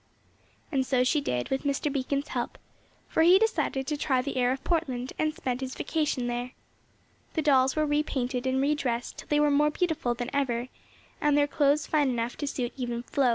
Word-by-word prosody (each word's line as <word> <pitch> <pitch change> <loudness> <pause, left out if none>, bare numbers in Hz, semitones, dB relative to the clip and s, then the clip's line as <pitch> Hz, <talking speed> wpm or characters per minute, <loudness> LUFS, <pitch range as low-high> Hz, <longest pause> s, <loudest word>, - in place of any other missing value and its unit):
And 270 -3 +2
so 255 -1 +2
she 290 +4 +2
did 125 - -2
with 270 - 0
Mr. 285 0 -1
Beacon's 280 +1 -1
help, 245 -2 -3 0.5
for - - +1
he 350 +3 +7
decided 395 -10 0
to 300 - -1
try 275 -3 +1
the 260 +2 -3
air 250 -1 +2
of 265 +1 -3
Portland, 260 -7 -1
and 310 0 +2
spent 255 0 -3
his 260 0 -4
vacation 295 -5 -1
there. 245 +1 -3 0.8
The 315 - +1
dolls 265 -2 +4
were 310 0 +2
re 295 0 +2
painted 255 -3 -2
and 260 0 +1
re 280 +2 +3
dressed 245 -5 -3
till - - -10
they 295 - +2
were 295 0 +4
more 295 +1 +4
beautiful 300 -7 -1
than 245 +1 -4
ever, 255 -3 0 0.5
and 295 -1 +3
their 290 - +5
clothes 290 0 +2
fine 295 -3 +2
enough 240 -1 -2
to 290 - -3
suit 245 -3 -3
even 240 -3 -3
Flo. 265 0 +1
270 Hz, 205 wpm, -28 LUFS, 250-295 Hz, 0.8 s, he